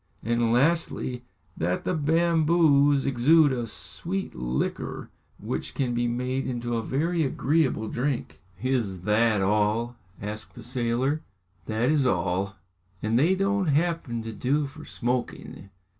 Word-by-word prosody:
"And 115 0 +1
lastly, 130 -2 +1 0.3
that 90 +2 -1
the - - -1
bamboos 155 -3 +3
exude 145 +4 +5
a 120 -3 -2
sweet 190 - -4
liquor 60 +2 -3 0.3
which - - -4
can 125 -3 0
be 120 0 0
made 125 +2 -2
into 120 -2 -2
a 115 - 0
very 160 +8 0
agreeable 135 -4 +1
drink." 125 +3 -3 0.2
"Is 115 -9 0
that 105 +1 +2
all?" 105 +4 +1 0.2
asked 105 +2 -7
the 120 - -9
sailor. 125 +4 0 0.5
"That 115 +5 +1
is 145 -4 +3
all!" 95 +1 0 0.5
"And 110 +2 +2
they 170 +7 +4
don't 195 -1 +1
happen 150 -6 0
to 115 0 -6
do 140 +7 0
for 155 +3 -10
smoking?" 120 -4 -3
125 Hz, 130 wpm, -26 LUFS, 115-150 Hz, 0.5 s, exude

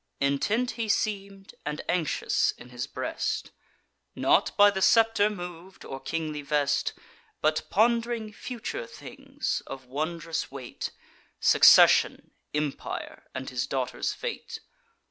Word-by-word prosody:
Intent 205 - +1
he 230 -2 -4
seem'd, 200 -2 -2
and 150 +1 -4
anxious 170 -4 +1
in 120 - -13
his 120 -1 -5
breast; - - -3 0.6
Not - - +2
by 205 0 +8
the 190 -1 -3
scepter 225 -1 +5
mov'd, 180 -2 -8
or 135 - -6
kingly 155 +1 -3
vest, 145 -1 +1 0.5
But 155 0 0
pond'ring 230 0 +1
future 250 - -5
things 475 - -5
of 130 -1 -8
wondrous 160 +5 -3
weight; 130 -3 -6 0.5
Succession, - - +6 0.2
empire, 150 -1 -4
and 130 0 -4
his 125 0 -2
daughter's 130 -2 -2
fate. 470 -1 -5
175 Hz, 115 wpm, -27 LUFS, 140-220 Hz, 0.6 s, by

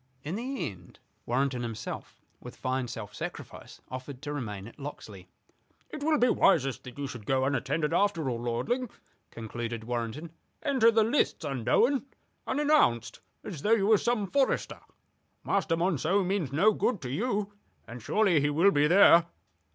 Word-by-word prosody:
In 155 - -4
the 255 +6 -3
end 90 -3 -12 0.3
Warrenton 130 +1 0
himself, 115 -2 -6 0.2
with - - -10
fine 130 -1 -2
self 115 -4 -7
sacrifice, - - -8
offered 130 +1 -7
to 145 0 -4
remain 105 -8 -5
at 120 - -15
Locksley. 105 -10 -9 0.6
"It 300 - -7
will 305 +1 +2
be 250 - +4
wisest 135 - +2
that 125 +1 -10
you 145 - -3
should 120 -6 -8
go 130 0 +2
unattended, 140 +3 -1
after 175 -5 +1
all, 120 -2 -2
lording," 125 - -2 0.4
concluded 115 0 -6
Warrenton. 120 +7 -4 0.3
"Enter 265 -6 +4
the 225 -1 +4
lists 230 - 0
unknown, 225 - +1 0.4
unannounced, 290 - +2 0.2
as 150 - -7
though 215 - +3
you 205 -4 +3
were 215 -1 +5
some 235 -3 0
forester. 270 +8 0 0.6
Master 180 -4 0
Monceux 180 +2 +1
means 185 -7 -1
no 195 +10 +4
good 230 0 0
to 125 - -4
you, 205 - -1 0.3
and 120 +1 -9
surely 190 - +2
he 145 - +2
will 165 +7 +4
be 145 -2 +3
there. 170 -1 +6
150 Hz, 160 wpm, -29 LUFS, 125-210 Hz, 0.6 s, there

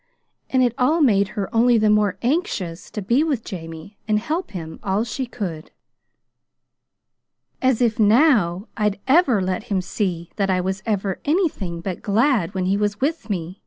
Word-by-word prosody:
And 260 -1 +3
it 245 -2 +2
all 300 +7 +3
made 205 -9 +4
her 195 -2 -1
only 235 +1 +4
the 215 -1 +3
more 210 -2 +2
anxious 225 - -2
to 210 - -5
be 240 +9 +2
with 280 -8 -1
Jamie 165 +1 -9
and 215 -1 +2
help 310 - -2
him 160 -4 -7
all 200 +2 0
she 250 +2 -4
could. 180 -10 -6 1.9
"As 255 -2 +2
if 230 -2 +1
NOW 215 - +3
I'd 210 -2 0
ever 265 - +4
let 185 0 -2
him 195 -2 0
see 180 -2 -3
that 195 -2 0
I 185 -1 +2
was 190 +1 -2
ever 200 -3 -1
anything 285 - -1
but 185 0 -5
glad 215 - +1
when 185 -1 -1
he 195 +2 +1
was 205 0 -1
with 285 -4 -2
me!" 180 -1 -4
210 Hz, 170 wpm, -22 LUFS, 185-245 Hz, 1.9 s, made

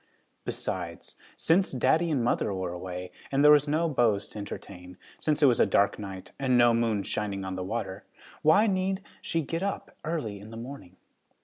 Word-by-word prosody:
Besides, 85 -2 -4 0.2
since 185 +4 +3
daddy 160 +6 +2
and 140 -6 +1
mother 115 - +1
were 95 -2 -3
away, 90 0 -6 0.2
and 140 +1 +3
there 150 - +9
were 150 - +9
no 160 +3 +2
beaus 115 -9 +2
to 105 - -8
entertain, 90 -3 -8 0.2
since 155 -1 0
it - - +9
was 125 -4 +4
a - - +5
dark 100 0 +2
night 95 -2 -7
and 130 -2 +3
no 120 -1 +6
moon 115 -3 +1
shining 100 -2 -3
on 95 - -4
the 95 - -3
water, 100 -1 -4 0.4
why 160 +8 +5
need 190 -1 0 0.2
she 165 -1 -1
get 165 +4 -3
up 200 0 -3
early 150 -11 -3
in 105 +2 -11
the 115 - -9
morning? 120 -6 -9
115 Hz, 190 wpm, -28 LUFS, 95-155 Hz, 0.4 s, there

